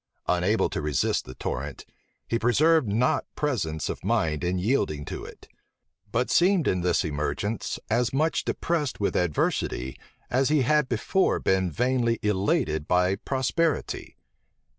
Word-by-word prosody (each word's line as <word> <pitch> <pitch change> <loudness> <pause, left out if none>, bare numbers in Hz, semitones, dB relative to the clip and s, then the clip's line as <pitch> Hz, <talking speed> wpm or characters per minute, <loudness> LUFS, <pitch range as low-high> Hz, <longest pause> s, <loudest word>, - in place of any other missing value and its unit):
Unable 90 +5 +2
to - - -2
resist 75 -3 0
the 65 - -10
torrent, 70 +2 -5 0.4
he 115 - 0
preserved 150 +4 +3
not 125 +8 +1
presence 100 - -1
of - - -5
mind 90 -8 0
in 90 +1 0
yielding 90 - 0
to - - -6
it; - - -12 0.6
but 125 +3 0
seemed 180 -2 +4
in 90 - +1
this 90 -1 +1
emergence 80 +8 -2
as 120 +1 +1
much 155 +4 +1
depressed 155 -6 -1
with 100 - 0
adversity, 70 -6 0 0.4
as 130 +2 +2
he 150 -3 +3
had 150 +1 +2
before 130 - +1
been 95 -1 +1
vainly 120 - +1
elated 100 - 0
by 90 +1 +3
prosperity. 140 +7 -1
115 Hz, 140 wpm, -26 LUFS, 90-135 Hz, 0.6 s, seemed